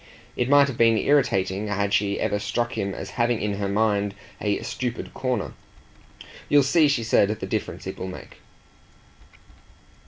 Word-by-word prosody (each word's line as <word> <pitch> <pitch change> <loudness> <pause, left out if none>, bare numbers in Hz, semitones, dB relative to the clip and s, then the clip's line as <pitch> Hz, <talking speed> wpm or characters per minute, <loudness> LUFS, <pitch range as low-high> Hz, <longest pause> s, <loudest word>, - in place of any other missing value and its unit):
It 125 +1 -1
might 140 0 +6
have 135 -4 -6
been 115 -1 +5
irritating 105 -7 +1
had 100 -1 -1
she 100 -1 +1
ever 105 - 0
struck 120 +3 -2
him 100 -3 -2
as - - -7
having 120 -1 +2
in 105 -1 -2
her 100 -1 -1
mind 100 -1 +1 0.3
a 105 -1 0
stupid 125 -2 -4
corner. 125 -5 -2 1.0
"You'll 145 -1 +5
see," 150 +3 +4
she 140 -5 +1
said, 110 -3 +3
"the - - -4
difference - - -4
it - - -6
will 95 - -4
make." 90 - -10
110 Hz, 160 wpm, -24 LUFS, 100-125 Hz, 1.0 s, might